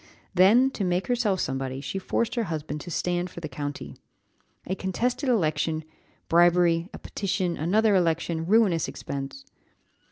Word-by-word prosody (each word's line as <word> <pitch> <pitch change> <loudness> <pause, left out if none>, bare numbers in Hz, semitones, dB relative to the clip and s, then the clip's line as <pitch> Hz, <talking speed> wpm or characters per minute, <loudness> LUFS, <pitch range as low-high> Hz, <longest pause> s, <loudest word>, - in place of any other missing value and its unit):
Then, 215 +9 +5
to 210 - -3
make 180 0 0
herself 235 -6 +1
somebody, 135 0 -3
she 195 +7 -4
forced 225 +4 -1
her 235 -2 0
husband 155 -3 -4
to - - -8
stand 175 +1 -1
for 170 - -9
the 165 - -5
county. 145 0 -6 0.7
A 185 - -2
contested 240 - -1
election 160 -7 +1 0.4
bribery 170 0 +4
a - - -8
petition 190 -3 -2
another 210 +7 +2
election 165 -2 +1
ruinous 200 -5 +3
expense. 140 - -6
175 Hz, 140 wpm, -26 LUFS, 160-205 Hz, 0.7 s, Then